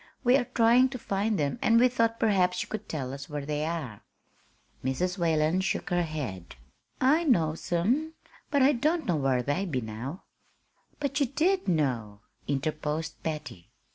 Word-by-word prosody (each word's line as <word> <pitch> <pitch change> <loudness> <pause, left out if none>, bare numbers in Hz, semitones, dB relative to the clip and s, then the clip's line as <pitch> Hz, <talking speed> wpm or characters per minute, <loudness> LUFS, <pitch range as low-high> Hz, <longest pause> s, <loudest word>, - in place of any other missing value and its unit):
We 250 0 +5
are 270 - +2
trying 240 +3 +5
to 260 - -5
find 210 -1 -1
them, 145 +8 -1
and 230 0 +4
we 250 - +6
thought 230 -2 0
perhaps 180 -4 +2
you - - -13
could 215 - -6
tell 135 -4 -3
us 140 +1 -8
where 145 -2 -4
they 150 +1 -2
are." 150 -11 -4 0.8
Mrs. 180 +9 -1
Whalen 165 +1 +2
shook 190 - -2
her 175 0 +2
head. 135 - -5 0.4
"I 295 +6 +4
knows 165 - +1
'em, 250 - +1 0.4
but 285 -2 +3
I 275 - +6
don't 305 +5 0
know 175 -4 +1
whar 135 -3 +1
they 145 +9 0
be 140 -7 -1
now." 120 - -6 0.8
"But 280 0 -1
you 280 - +2
did 340 - +1
know," 125 - -1 0.3
interposed 155 +2 -2
Patty. 150 - -6
170 Hz, 170 wpm, -28 LUFS, 145-235 Hz, 0.8 s, we